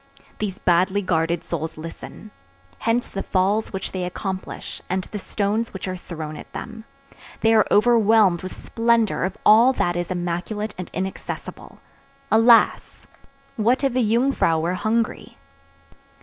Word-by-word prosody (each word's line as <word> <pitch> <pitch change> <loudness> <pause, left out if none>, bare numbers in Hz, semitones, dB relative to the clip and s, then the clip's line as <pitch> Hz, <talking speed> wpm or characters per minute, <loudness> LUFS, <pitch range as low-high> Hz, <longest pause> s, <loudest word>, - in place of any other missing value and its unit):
These 195 -3 -3
badly 185 +3 +2
guarded 165 -1 0
souls 160 -2 -4
listen. 165 +6 -9 0.5
Hence 235 +2 0
the 195 - -5
falls 200 +3 0
which 190 -1 -4
they 185 -1 -3
accomplish, 185 +1 -5
and 185 +1 -1
the 210 - -7
stones 210 +4 -2
which 190 - -5
are 185 - -3
thrown 155 -4 -7
at - - -12
them. 225 -1 -8 0.6
They 225 0 +4
are 215 -2 +4
overwhelmed 215 -5 +4
with 185 - -9
splendor 230 -1 +1
of 190 +3 -4
all 230 +5 +7
that 175 -8 0
is 175 0 -3
immaculate 185 +4 -3
and 180 - -7
inaccessible. 190 +2 -6 0.5
Alas! 230 +1 +4 0.5
what 235 +5 +2
if 270 -3 +1
the 255 -1 +2
Jungfrau 235 -9 +2
were 170 +3 -1
hungry? 220 +4 -2
200 Hz, 140 wpm, -22 LUFS, 180-225 Hz, 0.6 s, all